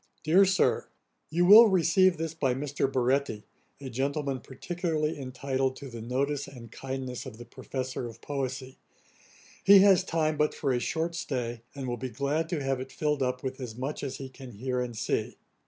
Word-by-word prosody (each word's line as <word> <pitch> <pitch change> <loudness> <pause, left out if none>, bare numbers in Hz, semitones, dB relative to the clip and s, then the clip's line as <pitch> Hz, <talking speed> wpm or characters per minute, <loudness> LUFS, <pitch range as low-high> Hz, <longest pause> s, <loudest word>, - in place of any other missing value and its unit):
'DEAR 180 +6 +6
SIR, 190 0 +2 0.4
'You 175 +3 +2
will 215 +5 +10
receive 185 -1 +4
this 165 0 -3
by 135 -6 0
Mr. 140 0 -1
Baretti, 130 -4 0 0.4
a 140 - -7
gentleman 135 +2 -2
particularly 160 +4 -2
intitled 130 0 -2
to 140 -2 -9
the 115 -1 -7
notice 135 +4 -1
and 120 -5 -11
kindness 130 -1 -5
of 115 -4 -9
the 120 - -10
Professor 130 +1 -5
of 115 0 -11
poesy. 130 -1 -4 0.9
He 200 0 +8
has 195 -2 +6
time 155 -4 0
but 150 0 +1
for 135 -3 0
a 120 - +1
short 165 +6 -2
stay, 120 -7 -3
and 135 -2 -5
will 120 0 -2
be 130 +2 -4
glad 145 +5 -1
to 160 -6 -2
have 135 -1 0
it 130 +1 -7
filled 150 -2 -1
up 125 0 -1
with 130 0 -4
as 120 -4 -6
much 135 +5 -4
as 135 -2 -3
he 135 - -6
can 130 -1 -11
hear 125 +4 -2
and 120 -2 -5
see. 115 - -2
135 Hz, 190 wpm, -28 LUFS, 125-155 Hz, 0.9 s, will